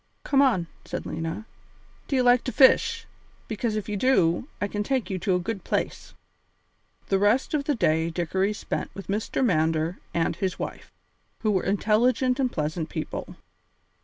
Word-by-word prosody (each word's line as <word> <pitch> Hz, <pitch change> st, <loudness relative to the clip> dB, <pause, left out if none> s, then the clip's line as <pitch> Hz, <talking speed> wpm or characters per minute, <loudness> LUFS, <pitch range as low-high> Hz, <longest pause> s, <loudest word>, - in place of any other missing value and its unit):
"Come 275 Hz, -1 st, +3 dB
on," 230 Hz, -11 st, +3 dB, 0.2 s
said -, -, -5 dB
Lena, 165 Hz, +6 st, -4 dB, 0.6 s
"do 275 Hz, -, -1 dB
you 255 Hz, -, +3 dB
like 245 Hz, 0 st, +5 dB
to 255 Hz, -, -1 dB
fish! 455 Hz, -, +4 dB, 0.4 s
Because 220 Hz, 0 st, -2 dB
if 215 Hz, -, -3 dB
you 210 Hz, -, -2 dB
do, 195 Hz, -4 st, +2 dB
I 205 Hz, -, 0 dB
can 205 Hz, +1 st, -3 dB
take 255 Hz, 0 st, -1 dB
you 185 Hz, -, -2 dB
to 185 Hz, 0 st, +1 dB
a -, -, +1 dB
good 195 Hz, +2 st, -4 dB
place." -, -, -3 dB, 0.9 s
The 195 Hz, -, +3 dB
rest 210 Hz, +9 st, +2 dB
of 290 Hz, -2 st, 0 dB
the 290 Hz, -, +1 dB
day 160 Hz, -6 st, +2 dB
Dickory 190 Hz, +4 st, 0 dB
spent -, -, -4 dB
with 195 Hz, -, -9 dB
Mr. 210 Hz, +5 st, 0 dB
Mander 160 Hz, -2 st, +1 dB
and 165 Hz, -1 st, 0 dB
his 190 Hz, -2 st, -2 dB
wife, -, -, -6 dB, 0.5 s
who 215 Hz, -, +2 dB
were 190 Hz, -3 st, +2 dB
intelligent 235 Hz, +6 st, +2 dB
and 255 Hz, -2 st, +1 dB
pleasant 155 Hz, +1 st, -2 dB
people. -, -, -5 dB
205 Hz, 170 wpm, -26 LUFS, 175-250 Hz, 0.9 s, like